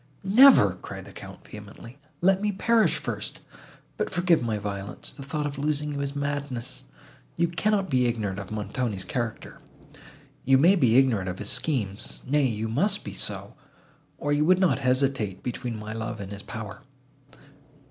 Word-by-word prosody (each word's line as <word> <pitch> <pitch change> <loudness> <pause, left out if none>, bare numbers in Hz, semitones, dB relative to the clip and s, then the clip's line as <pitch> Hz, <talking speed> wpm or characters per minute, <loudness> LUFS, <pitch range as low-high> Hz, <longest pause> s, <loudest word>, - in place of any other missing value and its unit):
"Never!" 195 - +7
cried - - -8
the - - -11
Count - - -11
vehemently: 105 +5 -11 0.2
"let 190 +2 +4
me 210 0 +1
perish 225 +3 +3
first! - - -4 0.6
But - - -1
forgive 175 -2 +2
my 115 -3 -1
violence! 100 -1 -5
the - - -11
thought 145 +2 -3
of 140 -1 -4
losing 150 0 -1
you 140 - -3
is 140 0 -3
madness. 145 -4 -3 0.5
You 170 0 +3
cannot 195 +3 0
be 130 -5 +2
ignorant 105 -5 -2
of 100 - -7
Montoni's 105 -1 -2
character, 115 +4 -4 0.8
you 135 +1 +5
may 170 +8 +6
be 125 - +4
ignorant 115 -9 +3
of 90 - -5
his 105 - -3
schemes—nay, 130 +2 -1
you 110 -2 -2
must 150 - 0
be - - -7
so, - - -4 0.6
or 145 0 -1
you 145 +1 +3
would 180 +3 +5
not 185 -6 +2
hesitate 130 -7 0
between 120 -1 -4
my 110 0 -6
love 110 -1 -4
and 100 -1 -7
his 100 0 -7
power." 110 -2 -7
130 Hz, 165 wpm, -26 LUFS, 110-150 Hz, 0.8 s, Never